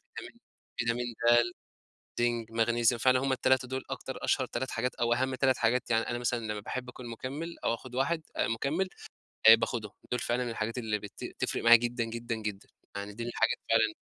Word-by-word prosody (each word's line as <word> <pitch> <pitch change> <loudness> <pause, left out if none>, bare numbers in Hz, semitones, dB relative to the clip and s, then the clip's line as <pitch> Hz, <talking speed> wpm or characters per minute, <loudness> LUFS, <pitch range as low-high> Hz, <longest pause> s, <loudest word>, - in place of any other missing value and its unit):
فيتامين - - -9 0.4
فيتامين 120 +1 0 0.2
دال، 120 0 +4 0.7
زنك، 120 -1 0
ماغنيسيوم، 115 +1 +2
فعلًا 130 0 +4
هُم 135 0 0
ال3 130 0 +2
دول 130 +1 -4
أكتر - - -5
أشهر - - +1
3 130 +2 -3
حاجات 125 +2 -2
أو 120 0 +2
أهم 130 +2 0
3 130 -1 +2
حاجات 120 +2 +1
يعني 115 0 +2
أنا 120 - -1
مثلًا 120 0 0
لمّا 105 -1 -3
باحب 125 +4 -5
أكون 125 -1 -9
مُكمل 140 +8 -5
أو 115 - +2
آخد 125 +1 -8
1 160 +5 +1
آآ، - - +1
مُكمل 150 +11 -1 0.6
آآ، 115 - +13
باخدهم، 110 -2 -2 0.2
دول 125 - 0
فعلًا 120 0 -1
الحاجات 115 +2 -3
اللي 110 -3 -1
بت 100 -1 -9
تفرق - - -1
معايا 120 0 +10
جدًا 120 0 -1
جدًا 115 0 -4
جدًا، 105 -3 -5 0.3
يعني 100 +1 -5
دي 115 - -6
من - - -4
الحاجات 115 -1 +1
فعلًا 110 -1 +3
120 Hz, 195 wpm, -30 LUFS, 115-130 Hz, 0.7 s, آآ